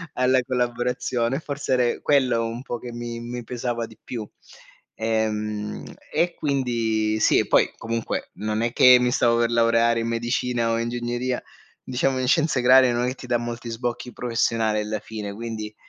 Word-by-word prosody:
alla 130 0 +3
collaborazione, 125 +1 -1
forse 145 -3 -3
ere 125 -2 +1
quello 130 -5 +2
un 115 +1 -5
po' 120 -3 -5
che 120 - -8
mi 120 0 -5
mi 120 +1 -6
pesava 120 0 -3
di 110 - -16
più. 110 -4 -6 0.7
Ehm, 105 -1 -2 0.3
e 175 0 +1
quindi 115 -6 0
sì, - - +4
e - - 0
poi - - +4
comunque 115 0 -3
non 105 +2 -2
è 115 0 0
che 125 -1 +8
mi 125 0 +1
stavo 120 -1 +3
per 120 0 +2
laureare 115 0 +3
in 115 - -2
medicina 120 0 0
o 115 - +1
ingegneria, 120 +1 -2 0.4
diciamo 130 +1 0
in 130 - -1
scienza 150 -2 +2
agraria 130 0 +6
non 120 +1 0
è - - 0
che 130 - -5
ti 125 - -11
dà 120 -1 +2
molti 120 0 -5
sbocchi 120 +1 -4
professionali 115 -2 0
alla 105 0 -3
fine, 105 -1 -6
quindi, 110 -1 -6
120 Hz, 175 wpm, -24 LUFS, 115-125 Hz, 0.7 s, che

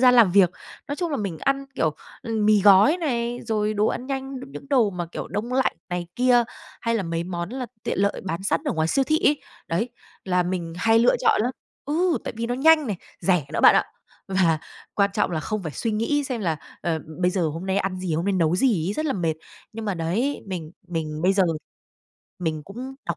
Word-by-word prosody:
gian 250 -1 +7
làm 225 -7 +7
việc. 195 -3 +6 0.4
Nói 285 - -2
chung 345 -3 -2
là 285 - 0
mình 195 -7 -3
ăn, 275 0 0
kiểu, 155 -2 +1 0.3
ừm, 220 -2 0
mì 210 -1 +5
gói 205 - +7
này, 245 -7 -1
rồi 215 -1 0
đồ 210 +1 +2
ăn 250 +3 -2
nhanh, 270 0 -4
những 270 - -10
những 275 - -9
đồ 235 -7 +4
mà, 175 -2 -4
kiểu, - - -5
đông 210 +8 -3
lạnh 265 0 +1
này 175 -1 -3
kia, 245 -1 +4 0.4
hay 230 0 0
là 215 - 0
mấy 165 0 -2
món 170 -1 -4
là 255 0 -4 0.2
tiện - - -2
lợi 200 0 +1
bán 185 0 -3
sẵn 200 - +1
ở 285 - 0
ngoài 160 0 0
siêu 270 +6 +2
thị 310 +3 +2
ấy. 290 - +3 0.3
Đấy, 205 +9 0 0.4
là 180 -1 +2
mình 175 -2 -3
hay 225 +4 +4
lựa 240 - +4
chọn - - +3
lắm. 245 - +1 0.3
Ừ, 330 +4 +1
tại - - -3
vì 230 +1 -2
nó 245 - -1
nhanh 310 +3 +5
này, 210 -5 -2 0.2
rẻ 180 -7 +2
nữa - - 0
bạn - - +8
ạ. - - +4 0.4
Và 185 -5 +3 0.4
quan 200 -1 +3
trọng - - +1
là 160 -2 -1
không 215 +5 -3
phải 160 -3 -5
suy 230 - -2
nghĩ 280 +7 +1
xem 250 -4 -3
là, 165 -5 0 0.2
ờ, 165 -2 0 0.2
bây 180 - +4
giờ 185 -1 0
hôm 165 +5 -5
nay 190 +1 0
ăn 190 -1 -1
gì, 180 -4 -1
hôm 165 +2 -1
nay 200 - +1
nấu 175 -2 +2
gì 195 -9 +2
ấy, - - 0
rất 310 +8 -2
là 275 - +1
mệt. 165 -4 0 0.4
Nhưng 225 0 -6
mà 200 -3 -1
đấy, 190 +13 -1
mình 175 -4 -5 0.2
mình 155 -2 -3
bây 185 - +4
giờ 195 0 +3 1.0
mình 160 -3 -2
cũng 250 - -7
đọc 170 -1 -1
205 Hz, 240 wpm, -24 LUFS, 175-250 Hz, 1.0 s, bạn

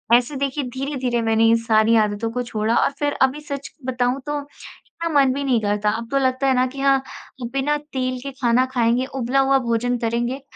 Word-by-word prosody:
ऐसे 250 +4 +1
देखिए 280 +1 -2
धीरे-धीरे 260 -2 -2
मैंने 225 0 +2
ये 225 0 +5
सारी 225 0 +3
आदतों 215 0 +1
को 250 - -2
छोड़ा, 225 -1 -1
और - - +3
फ़िर 290 0 0
अभी 265 +3 +2
सच 280 -2 -6 0.2
बताऊँ 250 0 0
तो, 295 0 -1 0.4
इतना 335 0 -6
मन 270 -2 +4
भी 280 +1 -3
नहीं 255 -4 +2
करता। 210 0 0
अब 225 +2 -3
तो 275 - +2
लगता 260 0 +1
है 265 - +4
ना 255 - +3
कि 270 +2 -9
हाँ 275 0 +4 0.4
अ, - - -3
बिना 280 +2 +1
तेल 260 -4 -4
के 275 - -5
खाना 245 +1 +3
खाएँगे, 240 +1 +2
उबला 265 0 -1
हुआ 270 0 +4
भोजन 245 +2 0
करेंगे, 240 +3 -2
255 Hz, 210 wpm, -21 LUFS, 230-275 Hz, 0.4 s, ये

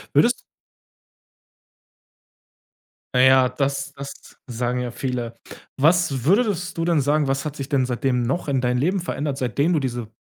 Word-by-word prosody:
Würdest - - +4 2.8
Ja, 125 - +5
ja, 130 -1 +6
das 140 +1 -2
das 140 0 -10
sagen 125 +1 -2
ja 125 -1 -3
viele. 120 -2 -4 0.4
Was 150 -3 +2
würdest 190 - +1
du - - +1
denn 170 -2 +2
sagen, 145 +1 +1
was 135 +2 -1
hat 150 - -4
sich 140 -2 -6
denn 135 -3 +2
seitdem 125 0 0
noch 135 +9 -2
in 135 -2 +1
dein 125 0 0
Leben 180 +8 +1
verändert, 145 -5 -3
seitdem 140 +6 0
du 155 - +2
diese 120 -4 -3
135 Hz, 155 wpm, -22 LUFS, 125-150 Hz, 2.8 s, ja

